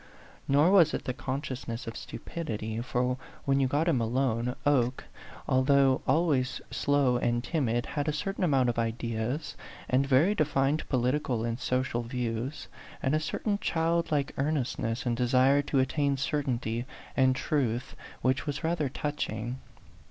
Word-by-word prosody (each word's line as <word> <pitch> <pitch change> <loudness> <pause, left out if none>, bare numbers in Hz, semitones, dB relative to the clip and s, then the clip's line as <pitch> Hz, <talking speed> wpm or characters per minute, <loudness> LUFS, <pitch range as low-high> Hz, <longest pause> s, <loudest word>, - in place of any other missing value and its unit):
Nor 145 +6 +4
was 175 -6 +6
it - - -5
the 125 - -1
consciousness 130 -2 -4
of 115 - -6
stupidity; 110 -9 -5
for 125 +1 -1 0.3
when 135 0 +3
you 135 - +3
got 145 +5 +1
him 135 -8 +2
alone, 125 0 0
Oke, 130 -3 +2 0.4
although 135 0 +4
always 145 -6 +2
slow 140 -4 +2
and 120 0 0
timid, 120 -7 0
had 145 0 -3
a - - +2
certain 195 +6 -3
amount 135 -7 +3
of 120 - -1
ideas, 115 +5 -2 0.3
and 130 +2 +3
very 145 +9 +4
defined 150 -4 +1
political 125 -2 0
and 115 +1 -2
social 125 -2 0
views, 120 +3 -3 0.4
and 130 - +1
a 155 - +3
certain 200 +6 -2
childlike 165 -5 0
earnestness 135 -5 -1
and 120 -1 +1
desire 130 +3 +4
to 145 0 -2
attain 140 +1 +1
certainty 125 -4 -1 0.3
and 130 -1 +4
truth 130 -5 -1 0.3
which 130 +2 +1
was 145 - -3
rather 160 -4 0
touching. 125 -4 -3
130 Hz, 145 wpm, -29 LUFS, 120-145 Hz, 0.4 s, was